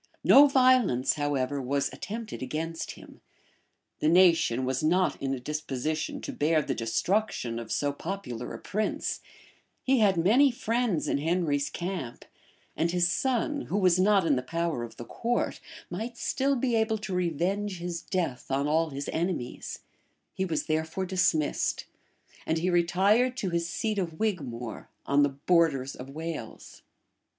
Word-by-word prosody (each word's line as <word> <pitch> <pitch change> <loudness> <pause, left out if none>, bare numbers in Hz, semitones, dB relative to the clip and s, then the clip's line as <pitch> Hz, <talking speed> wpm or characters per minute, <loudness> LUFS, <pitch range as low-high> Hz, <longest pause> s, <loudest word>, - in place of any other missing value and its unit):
No 285 +2 +8
violence, 255 - +4
however, 145 -2 -1
was 140 +2 -1
attempted 220 +1 -6
against 160 +5 -4
him: - - -15 0.8
the 155 - +2
nation 165 -8 +4
was 130 0 -1
not 180 +4 +2
in 135 - -1
a - - -6
disposition 150 +2 -3
to - - -5
bear 155 +1 +2
the 135 - -2
destruction 120 - -1
of 115 -1 -8
so 145 -1 0
popular 140 -8 -5
a - - -6
prince: 215 +2 -2 0.6
he 265 -1 +3
had 200 -4 +4
many 230 +12 +5
friends 230 -7 -1
in - - +1
Henry's 155 -3 0
camp; 175 -9 -5 0.5
and 165 - +1
his 175 0 +2
son, 265 - 0
who 200 - -1
was 185 -3 +4
not 195 -1 +4
in 150 -4 +3
the 125 - 0
power 165 0 -2
of 115 -1 -9
the 120 - -7
court, 240 - -2 0.3
might 225 +6 -5
still 275 +3 0
be 245 -1 0
able 220 0 +1
to 210 -2 -5
revenge 180 +3 -1
his 170 -1 -4
death 170 -10 -3
on 140 +2 0
all 160 +2 +2
his 140 0 -5
enemies: 165 -7 -3 0.5
he 190 - -1
was 160 -4 -2
therefore 160 +4 -1
dismissed; 175 -5 +1 0.6
and 160 - +1
he 180 +3 0
retired 200 +9 +3
to 190 -7 -2
his 170 0 -1
seat 215 +4 -1
of 165 -4 -4
Wigmore, 130 - -3 0.2
on 140 +1 +3
the 145 - +4
borders 140 -2 +1
of 130 +1 -9
Wales. 155 -5 -7
170 Hz, 155 wpm, -28 LUFS, 140-200 Hz, 0.8 s, No